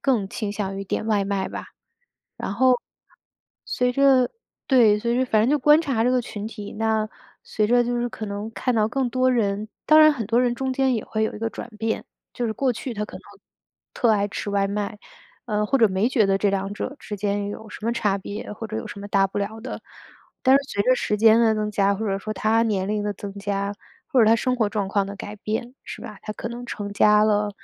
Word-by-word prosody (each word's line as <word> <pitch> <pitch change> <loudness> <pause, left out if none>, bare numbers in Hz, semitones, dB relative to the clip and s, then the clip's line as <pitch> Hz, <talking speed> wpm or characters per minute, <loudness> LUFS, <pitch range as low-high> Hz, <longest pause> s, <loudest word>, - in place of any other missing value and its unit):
更 230 -8 +1
倾 205 -1 -4
向 195 -2 -3
于 195 - -4
点 215 - -3
外 205 -3 +2
卖 195 -1 -1
吧。 - - -7 0.7
然 - - -4
后 255 +1 +4 0.9
随 250 0 0
着 265 -2 +4 0.4
对， 225 -6 +5
随 235 +2 0
着 260 - +2
反 215 -3 +3
正 240 - +2
就 295 - +3
观 300 +4 +6
察 245 -7 0
这 250 - +3
个 255 - +2
群 210 -2 -6
体 210 -2 -8
那， 220 -1 0 0.3
随 210 -1 0
着 245 +2 +4
就 240 0 -1
是 240 0 -1
可 220 - -7
能 205 +2 -4
看 250 - -1
到 215 -1 +3
更 255 0 -1
多 255 +1 +2
人 210 -2 0 0.2
当 310 0 +7
然 310 0 +8
很 235 -6 -4
多 235 +3 +2
人 245 -1 +1 0.2
间 265 -1 +2
也 220 - -2
会 220 0 -1
有 - - -3
一 - - -7
个 225 +1 -2
转 230 - -7
变， 225 0 -2 0.3
就 240 - -1
是 220 - -1
过 260 +1 0
去 240 +2 -6
他 210 0 -2
可 - - -9
能 - - -13 0.7
特 235 -3 +2
爱 205 -1 +1
吃 205 - -4
外 200 -1 +1
卖， 205 +1 -3 0.5
呃， 210 -1 0
或 275 - +2
者 225 - +5
没 195 +5 +1
觉 235 -6 +3
得 195 0 +2
这 205 - +2
两 195 0 -2
者 260 - -4
之 210 - -6
间 200 0 -1
有 215 +1 -8
什 210 - -9
么 235 - +1
差 210 -4 +1
别， 205 +2 -6
或 225 +1 -6
者 220 - -4
有 - - -4
什 200 - -8
么 205 - -7
大 195 -1 +3
不 195 - -10
了 210 +2 -3
的， 255 - -7 0.6
但 260 0 +5
是 280 - +1
随 200 - 0
着 255 - +5
时 210 -4 -1
间 225 +2 +6
的 220 -1 +4
增 210 0 -1
加， 200 0 +3
或 220 +2 -3
者 195 -1 0
说 215 - -4
他 225 +1 +2
年 195 -4 0
龄 210 0 -1
的 205 - -1
增 200 +1 -7
加， 200 0 -2 0.3
或 270 -5 +3
者 220 - +6
他 225 +1 +6
生 255 +2 0
活 220 -4 +1
状 205 -2 -2
况 200 0 +1
的 200 0 -7
改 205 +2 -7
变， 225 +4 -4
是 - - -8
吧， 210 -2 -9
他 215 - -5
可 - - -6
能 240 +1 -7
成 205 -1 -5
家 210 +1 +5
了， 210 -1 +2
215 Hz, 265 characters per minute, -23 LUFS, 205-240 Hz, 0.9 s, 然